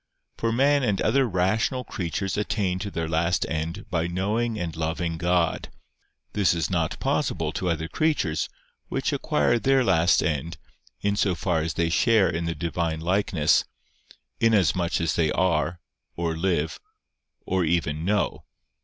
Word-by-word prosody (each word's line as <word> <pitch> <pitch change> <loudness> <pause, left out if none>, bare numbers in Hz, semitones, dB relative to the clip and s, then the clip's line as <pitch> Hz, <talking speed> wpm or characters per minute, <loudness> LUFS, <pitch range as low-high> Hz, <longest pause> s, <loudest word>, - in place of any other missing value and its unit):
For 115 - -1
man 140 +4 +3
and 105 -7 0
other 135 -2 +2
rational 105 +8 +1
creatures 95 -1 -3
attain 100 -3 -1
to 100 - -4
their 80 -4 -3
last 85 +2 +1
end 80 +2 -4
by 85 -1 0
knowing 105 +6 -1
and 85 -5 -4
loving 80 +1 -2
God: 90 -1 +1 0.6
this 100 -4 +2
is 85 +2 -1
not 80 -3 -1
possible 120 - 0
to 90 +2 -2
other 80 -1 -1
creatures, 145 - 0 0.4
which - - -1
acquire 120 - +1
their 135 +1 +3
last 90 -5 +3
end, 80 +1 -2 0.4
in 100 0 +1
so 100 -3 +1
far 85 -2 0
as 80 0 -3
they 85 -1 +1
share 105 +2 +3
in 85 -1 -2
the 85 0 -2
Divine 80 0 -2
likeness, 85 -2 +2 0.8
inasmuch 95 -6 +2
as 85 - 0
they 80 -3 +2
are, 85 -1 +1 0.4
or 85 -1 -1
live, 80 -2 -1 0.7
or 95 -1 +1
even 80 -2 0
know. 105 +3 0
90 Hz, 150 wpm, -25 LUFS, 80-105 Hz, 0.8 s, man